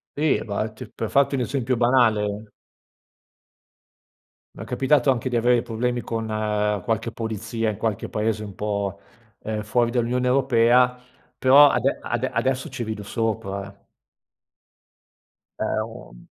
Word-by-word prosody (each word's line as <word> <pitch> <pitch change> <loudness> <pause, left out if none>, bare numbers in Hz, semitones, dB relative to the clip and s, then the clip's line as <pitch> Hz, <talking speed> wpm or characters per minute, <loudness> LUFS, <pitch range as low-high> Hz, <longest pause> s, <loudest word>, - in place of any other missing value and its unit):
Sì, 145 - -5
infatti 110 +2 -4
per 115 - -4
farti 140 +1 +3
un 135 - 0
esempio 125 +1 -1
banale 110 -4 +2 2.1
m'è - - -8
capitato 140 +1 +2
anche 130 0 +1
di 120 - -2
avere 120 0 +3
problemi 120 +2 -2
con 115 -1 -4 0.6
qualche 115 0 -1
polizia, 115 0 -3
in 105 - -8
qualche 110 -2 -2
paese 110 0 -1
un 100 -2 -8
po', 100 -1 -3 0.4
ehm, 110 -1 -3
fuori 115 +2 +1
dall'Unione 125 +1 0
Europea, 125 -1 +4 0.4
però 140 +3 +7
ade - - +1
ade - - -2
adesso 130 +4 -1
ci 130 -3 -5
rido 110 -2 -5
sopra. 100 -2 -3 1.8
È - - -1 0.2
un - - -12
115 Hz, 125 wpm, -23 LUFS, 110-125 Hz, 2.1 s, però